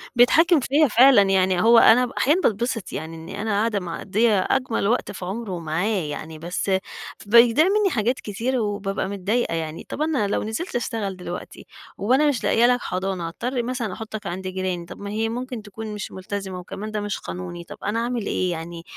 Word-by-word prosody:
بيتحكّم 320 +8 +5
فيّا 290 +4 +3
فعلًا 250 -1 +7
يعني. 190 -2 +2
هو 230 +1 +6
أنا 245 +3 +6
ب 245 - -8
أحيانًا 310 +7 +3
باتبسِط 225 - -1
يعني 160 +2 -5
إنّي 170 +5 -7
أنا 220 0 -2
قاعدة 210 +1 +1
مقضيّة 200 +4 +1
أجمل 255 -6 0
وقت 240 +4 0
في 190 - -7
عُمره 195 -1 -4
معاه 160 +3 -2 0.2
يعني، 155 +1 -6
بس 175 +4 -3 0.5
بيضيع 235 +7 +6
منّي 405 +1 +3
حاجات 240 - 0
كتير 235 +5 -2
وبابقى 205 -3 -2
متضايقة 200 +2 -1
يعني. 160 -1 -4
طَب - - -5
أنا 305 -9 +1
لو 200 - -1
نزِلت 220 - -4
أشتغل 220 -5 -2
دلوقتي 180 -1 -8 0.3
وأنا 260 +9 +3
مش 280 -5 0
لاقية 230 - +4
لك 245 0 +2
حضانة، 185 -2 -3
هاضطر 240 +8 -3
مثلًا 240 -5 -3
أحُطّك 215 +1 -6
عَند 185 +2 -4
جيراني، 185 -2 -3
طَب - - -11
ما 200 - -6
هي 220 +2 -1
ممكن 245 0 -5
تكون 215 +1 -8
مش 210 -1 -6
ملتزمة، 190 0 -5
وكمان 205 +4 -7
ده 210 -1 -2
مش 205 -1 -3
قانوني، 90 -1 -7
طَب - - -11
أنا 210 +3 -1
أعمل 235 -2 -2
إيه 185 -2 0
يعني، 165 0 -6
210 Hz, 190 wpm, -23 LUFS, 185-240 Hz, 0.5 s, فعلًا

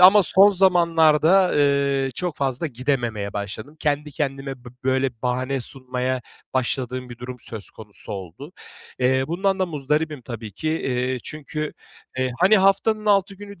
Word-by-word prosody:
ama 190 +3 +9
son 195 +2 +6
zamanlarda, 175 -1 +4
ııı, 140 -2 +2
çok 175 0 -3
fazla 135 +3 -1
gidememeye 120 -6 -2
başladım. 105 +8 -6
Kendi 150 0 0
kendime 135 -3 -4
bi - - -8 0.2
böyle 130 0 +2
bahane 130 +2 -1
sunmaya 130 0 -3 0.3
başladığım 130 0 -2
bir 120 -1 -10
durum 125 +1 -7
söz 110 -3 -7
konusu 105 -2 -9
oldu. 100 - -8 0.5
Eee, 130 +1 +2
bundan 190 +3 0
da 185 - +1
muzdaribim 150 -2 -1
tabii 115 -3 -7
ki. 155 +11 -4 0.3
İii, 125 0 -1
çünkü, 155 0 -5 0.5
eee, 130 0 +1
hani, 195 +5 +6
haftanın 200 +3 +2
6 200 -1 +3
günü 200 -1 -11
140 Hz, 145 wpm, -23 LUFS, 125-170 Hz, 0.5 s, ama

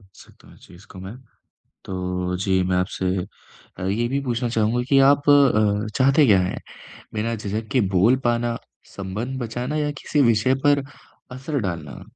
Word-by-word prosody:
सकता - - -18
हूँ - - -17
इस - - -19
चीज़ 90 +3 -16
को 95 - -11
मैं। 95 +4 -8 0.7
तो 90 -1 -3
जी, 95 0 +1
मैं 90 0 0
आपसे 90 +1 -2 0.7
अ, - - -6
ये 110 +5 0
भी 135 +3 -1
पूछना 120 -1 -1
चाहूँगा 115 +1 0
कि 135 -1 +4
आप 145 0 +1
अ, 110 -7 +4
चाहते 135 +3 +4
क्या 100 -5 +5
हैं, 90 - -3 0.5
बिना 115 +2 -1
झिझक 110 +1 -4
के 130 - +3 0.2
बोल 115 +8 +5
पाना, 120 0 0 0.4
संबंध 105 +7 -4
बचाना 120 +5 -3
या 150 -1 0
किसी 150 - 0
विषय 115 +4 +2
पर 145 -1 +4 0.5
असर 130 +3 -4
डालना? 80 -9 -5
115 Hz, 170 wpm, -22 LUFS, 95-130 Hz, 0.7 s, क्या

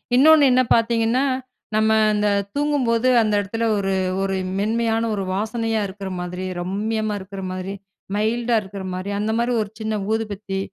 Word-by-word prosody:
இன்னொன்னு 300 +3 +7
என்ன 255 +1 +5
பாத்தீங்கன்னா 230 +2 +2 0.5
நம்ம 220 0 +3 0.2
இந்த 210 0 +2 0.2
தூங்கும்போது 265 -5 +1
அந்த 215 -1 +1
இடத்துல 225 +4 -2
ஒரு 195 -1 0 0.3
-ஒரு 195 0 0 0.2
மென்மையான 225 +2 +1
ஒரு 195 - -2
வாசனையா 225 +1 -1
இருக்குற 195 0 -7
மாரி, 180 +1 -4
ரம்மியமா 215 +4 -2
இருக்குற 195 0 -8
மாரி 185 +1 -4 0.4
மைல்டா 230 +3 +1
இருக்குற 195 -1 -8
மாரி, 185 +2 -4
அந்த 215 +1 0
மாரி 235 +1 +1
ஒரு 210 - -4
சின்ன 220 0 -2 0.2
ஊதுபத்தி, 205 -3 -3
215 Hz, 145 wpm, -22 LUFS, 195-230 Hz, 0.5 s, இன்னொன்னு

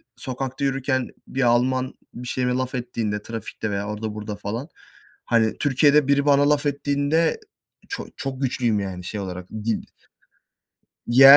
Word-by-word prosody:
sokakta 130 0 -4
yürürken 135 -1 +1 0.2
bir 135 - -2
Alman 130 +2 +3 0.2
bir 125 +1 -7
şeyime 125 -1 0
laf 130 0 -1
ettiğinde 115 -4 -2
trafikte 110 -1 -5
veya 100 +1 -2
orada 105 0 -3
burada 105 -1 -5
falan, 110 +8 -4 0.6
hani, 115 -2 +3
Türkiye'de 145 0 +4
biri 140 0 +3
bana 145 0 +5
laf 150 0 +3
ettiğinde 145 - +1 0.5
çok 400 - -4
çok 135 -1 -4
güçlüyüm, 120 -4 +1
yani, 95 -2 -4
şey 105 +4 -4
olarak 90 -2 -5
dil. 110 0 -2 1.2
Yani, 135 +3 +10
125 Hz, 145 wpm, -24 LUFS, 110-140 Hz, 1.2 s, Yani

